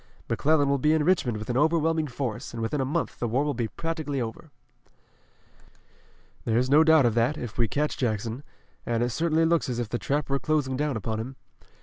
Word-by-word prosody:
McClellan 145 Hz, +5 st, +2 dB
will 140 Hz, 0 st, +1 dB
be 150 Hz, +4 st, +3 dB
in 160 Hz, -1 st, +2 dB
Richmond 145 Hz, -10 st, +2 dB
with 105 Hz, +3 st, -4 dB
an 120 Hz, -, -1 dB
overwhelming 160 Hz, +1 st, +2 dB
force, 125 Hz, -4 st, -4 dB
and 115 Hz, -, -4 dB
within 135 Hz, +5 st, -1 dB
a -, -, 0 dB
month 160 Hz, +5 st, -2 dB
the 120 Hz, -, -1 dB
war 125 Hz, +5 st, +1 dB
will 150 Hz, -1 st, -1 dB
be 115 Hz, -1 st, -2 dB
practically 155 Hz, -1 st, -3 dB
over." 115 Hz, -2 st, -5 dB, 1.9 s
"There's 120 Hz, +3 st, +1 dB
no 150 Hz, +3 st, +7 dB
doubt 160 Hz, -4 st, +5 dB
of 120 Hz, -, +3 dB
that, 120 Hz, +6 st, +1 dB
if 120 Hz, -1 st, -7 dB
we 115 Hz, -, +3 dB
catch 150 Hz, +6 st, -1 dB
Jackson, 115 Hz, +1 st, -2 dB, 0.4 s
and 120 Hz, 0 st, 0 dB
it 120 Hz, -, 0 dB
certainly 165 Hz, +4 st, +1 dB
looks 165 Hz, -4 st, +1 dB
as 120 Hz, -, -2 dB
if 120 Hz, -3 st, -3 dB
the 120 Hz, -, -2 dB
trap 145 Hz, +2 st, -1 dB
were 140 Hz, 0 st, 0 dB
closing 145 Hz, -4 st, 0 dB
down 145 Hz, -2 st, -1 dB
upon 110 Hz, 0 st, -3 dB
him. 130 Hz, +4 st, -6 dB
135 Hz, 210 wpm, -26 LUFS, 120-155 Hz, 1.9 s, no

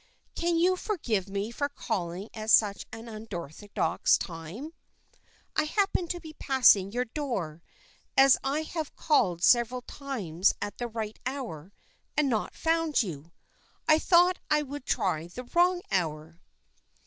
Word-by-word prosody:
"Can 340 Hz, 0 st, 0 dB
you 360 Hz, +2 st, +4 dB
forgive 235 Hz, -, -2 dB
me 200 Hz, +3 st, -3 dB
for 285 Hz, +4 st, -2 dB
calling 185 Hz, -7 st, -4 dB
at 215 Hz, 0 st, -5 dB
such 205 Hz, -3 st, +4 dB
an 225 Hz, +1 st, -9 dB
unorthodox 205 Hz, -4 st, -1 dB
time? 180 Hz, -, -7 dB, 0.8 s
I -, -, +2 dB
happened 375 Hz, 0 st, 0 dB
to 350 Hz, -, -2 dB
be 315 Hz, -2 st, -10 dB
passing 230 Hz, -8 st, +5 dB
your 245 Hz, +3 st, -1 dB
door, 225 Hz, -, -4 dB, 0.6 s
and 270 Hz, -, +9 dB
as 275 Hz, -, +7 dB
I 285 Hz, +4 st, 0 dB
have 315 Hz, -1 st, -5 dB
called 190 Hz, -, +2 dB
several 245 Hz, +1 st, +4 dB
times 205 Hz, -, -1 dB
at 205 Hz, -, -5 dB
the 240 Hz, -, -2 dB
right 220 Hz, -2 st, -5 dB
hour 215 Hz, -, -5 dB, 0.5 s
and 300 Hz, -2 st, +3 dB
not 220 Hz, -4 st, -1 dB
found 325 Hz, -4 st, +1 dB
you, 165 Hz, -4 st, -7 dB, 0.6 s
I 310 Hz, 0 st, +6 dB
thought 355 Hz, +2 st, +4 dB
I 300 Hz, 0 st, +3 dB
would 285 Hz, -1 st, -8 dB
try 170 Hz, -4 st, 0 dB
the 245 Hz, +9 st, -8 dB
wrong 350 Hz, +7 st, +2 dB
hour." 160 Hz, -1 st, -2 dB
235 Hz, 145 wpm, -28 LUFS, 190-300 Hz, 0.8 s, and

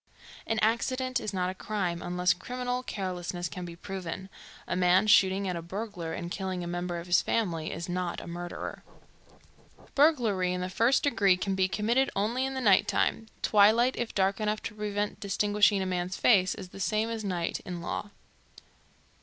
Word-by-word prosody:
An 225 Hz, -, 0 dB
accident 255 Hz, +3 st, +1 dB
is 215 Hz, -, -4 dB
not 185 Hz, -2 st, -1 dB
a -, -, -7 dB
crime, 185 Hz, -4 st, -3 dB
unless 180 Hz, +1 st, +1 dB
criminal 250 Hz, +6 st, -3 dB
carelessness 180 Hz, -5 st, -4 dB
can 175 Hz, +4 st, -6 dB
be 170 Hz, -1 st, -8 dB
proven. 190 Hz, +1 st, -6 dB, 0.4 s
A -, -, -1 dB
man 180 Hz, +2 st, +4 dB
shooting 195 Hz, -1 st, +4 dB
at 180 Hz, -, -1 dB
a 170 Hz, -, -4 dB
burglar 180 Hz, -1 st, -5 dB
and 170 Hz, +1 st, -5 dB
killing 185 Hz, -2 st, -3 dB
a -, -, -5 dB
member 175 Hz, 0 st, -3 dB
of 170 Hz, -, -6 dB
his 175 Hz, 0 st, +4 dB
family 170 Hz, -8 st, -1 dB
is 170 Hz, +3 st, -5 dB
not 180 Hz, -1 st, -2 dB
a -, -, -9 dB
murderer. 175 Hz, +1 st, -6 dB, 1.1 s
Burglary 230 Hz, -, +3 dB
in 180 Hz, -, -2 dB
the 180 Hz, -, -3 dB
first 230 Hz, +8 st, +2 dB
degree 200 Hz, -10 st, +3 dB
can 195 Hz, +1 st, -2 dB
be 190 Hz, -1 st, +2 dB
committed 235 Hz, +7 st, +1 dB
only 235 Hz, +6 st, 0 dB
in 270 Hz, -, -5 dB
the 260 Hz, -, -2 dB
night 205 Hz, -2 st, +5 dB
time. 225 Hz, -, 0 dB, 0.2 s
Twilight, 220 Hz, +5 st, +5 dB
if 240 Hz, -1 st, -4 dB
dark 195 Hz, +1 st, +2 dB
enough 215 Hz, 0 st, -1 dB
to 225 Hz, -, -5 dB
prevent 210 Hz, -1 st, -3 dB
distinguishing 205 Hz, 0 st, +2 dB
a -, -, -3 dB
man's 180 Hz, 0 st, -2 dB
face, 190 Hz, -5 st, +4 dB
is 190 Hz, -3 st, -9 dB
the 195 Hz, -, -11 dB
same 215 Hz, +3 st, +1 dB
as 225 Hz, -1 st, -4 dB
"night" 175 Hz, -4 st, -2 dB
in 180 Hz, -1 st, -5 dB
law. 190 Hz, +4 st, -4 dB
195 Hz, 185 wpm, -29 LUFS, 180-215 Hz, 1.1 s, night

